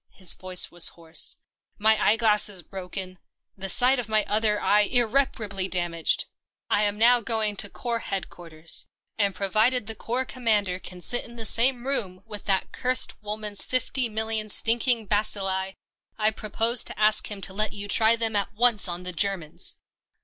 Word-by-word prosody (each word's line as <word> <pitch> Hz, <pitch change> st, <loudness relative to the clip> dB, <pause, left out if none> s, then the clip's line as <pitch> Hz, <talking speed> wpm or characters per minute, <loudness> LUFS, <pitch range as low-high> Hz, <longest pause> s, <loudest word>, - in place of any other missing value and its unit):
His 185 Hz, -3 st, -2 dB
voice 185 Hz, -1 st, 0 dB
was 175 Hz, -1 st, +1 dB
hoarse. 165 Hz, -1 st, +2 dB, 0.2 s
" -, -, -69 dB
My 220 Hz, +1 st, +4 dB
eye 215 Hz, -, +4 dB
glass 215 Hz, -2 st, +4 dB
is 190 Hz, -4 st, 0 dB
broken, 185 Hz, 0 st, -7 dB, 0.4 s
the 195 Hz, 0 st, -5 dB
sight 250 Hz, +7 st, +5 dB
of 230 Hz, -3 st, -4 dB
my 215 Hz, -1 st, +1 dB
other 210 Hz, 0 st, +1 dB
eye 210 Hz, +1 st, +3 dB
irreparably 220 Hz, -4 st, 0 dB
dam 175 Hz, -2 st, -2 dB
aged. 165 Hz, -1 st, +1 dB, 0.5 s
I 205 Hz, -, +3 dB
am 205 Hz, 0 st, -1 dB
now 240 Hz, +2 st, +5 dB
going 220 Hz, -1 st, 0 dB
to 205 Hz, -, 0 dB
Corps 235 Hz, +1 st, -4 dB
Headquarters, 170 Hz, -5 st, -2 dB, 0.3 s
and 200 Hz, -3 st, +1 dB
provided 215 Hz, +5 st, +1 dB
the 225 Hz, -, -3 dB
Corps 240 Hz, +4 st, -3 dB
Commander 210 Hz, -8 st, 0 dB
can 180 Hz, -1 st, -9 dB
sit 245 Hz, +6 st, -1 dB
in 235 Hz, -, -11 dB
the 225 Hz, -1 st, -4 dB
same 240 Hz, +3 st, +3 dB
room 195 Hz, -9 st, -1 dB
with 210 Hz, -3 st, -8 dB
that 195 Hz, -1 st, -1 dB
cursed 255 Hz, -1 st, +1 dB
woman's 210 Hz, -1 st, -2 dB
fifty 255 Hz, 0 st, -1 dB
million 220 Hz, 0 st, -3 dB
stinking 230 Hz, +2 st, +1 dB
bacilli, 195 Hz, -2 st, -1 dB, 0.4 s
I 215 Hz, 0 st, +1 dB
propose 225 Hz, +3 st, +1 dB
to -, -, -7 dB
ask 215 Hz, 0 st, +3 dB
him 205 Hz, -2 st, -6 dB
to 190 Hz, -, -1 dB
let 215 Hz, +2 st, -1 dB
you 205 Hz, -1 st, -7 dB
try 220 Hz, +2 st, +4 dB
them 225 Hz, -2 st, 0 dB
at 205 Hz, +1 st, -1 dB
once 235 Hz, -2 st, +3 dB
on 175 Hz, 0 st, -6 dB
the 180 Hz, 0 st, -4 dB
Germans." 180 Hz, -4 st, -2 dB
210 Hz, 180 wpm, -25 LUFS, 190-230 Hz, 0.5 s, sight